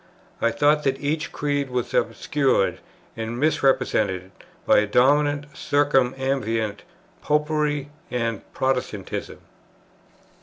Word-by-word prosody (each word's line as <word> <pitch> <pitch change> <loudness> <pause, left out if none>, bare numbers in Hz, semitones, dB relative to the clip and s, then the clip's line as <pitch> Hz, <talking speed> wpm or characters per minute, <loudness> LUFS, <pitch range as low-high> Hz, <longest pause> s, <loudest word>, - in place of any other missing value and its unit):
I 115 - +3
thought 150 +5 +3
that 135 0 0
each 155 +2 -2
creed 145 -2 -1
was 125 -1 -3
obscured 135 -9 +1 0.4
and 115 +1 -4
misrepresented 125 -10 +1 0.3
by - - +5
a 105 - 0
dominant 145 +5 +2
circumambient 130 -6 0 0.4
"Popery" 150 -1 0 0.2
and 115 -3 -2
"Protestantism." 125 -7 -3
135 Hz, 90 wpm, -23 LUFS, 115-145 Hz, 0.4 s, by